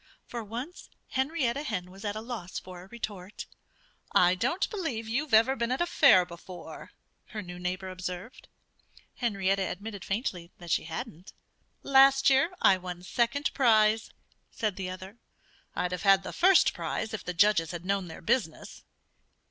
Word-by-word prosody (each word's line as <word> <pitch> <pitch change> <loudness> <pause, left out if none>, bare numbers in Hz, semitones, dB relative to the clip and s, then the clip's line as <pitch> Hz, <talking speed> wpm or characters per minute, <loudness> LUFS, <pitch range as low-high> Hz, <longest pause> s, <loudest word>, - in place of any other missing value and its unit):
For 235 -1 -6
once 245 - -7 0.2
Henrietta 265 -1 0
Hen 185 -10 -4
was 195 +1 -12
at 205 -1 -2
a 215 - -4
loss 220 -6 -6
for 180 -1 -8
a 185 - -13
retort. 205 -3 -7 0.7
"I 180 0 +6
don't 245 - 0
believe 275 - -3
you've 270 +6 -2
ever 230 +5 +5
been 235 -1 -1
at 255 - 0
a 345 - +2
fair 275 - +6
before," 175 +1 -10 0.4
her 215 -2 -6
new 175 -1 -9
neighbor 185 +1 -3
observed. 185 +4 -7 0.7
Henrietta 195 -5 0
admitted 200 +2 -5
faintly 190 -5 -3
that 175 -2 -8
she - - +1
hadn't. 160 +2 -7 0.5
"Last 275 0 +6
year 270 +5 +4
I 190 - +6
won 180 -1 -7
second 240 +8 0
prize," 220 -4 +3 0.4
said 215 -4 -2
the 190 -2 -4
other. 190 +4 -9 0.6
"I'd 180 - -1
have 180 - -3
had 195 -1 +5
the - - -6
first 370 +1 +5
if 220 -2 -3
the 180 - -5
judges 170 -3 +4
had 175 +1 -6
known 195 -1 0
their 160 - -10
business." 165 -5 -2
205 Hz, 160 wpm, -29 LUFS, 180-240 Hz, 0.7 s, I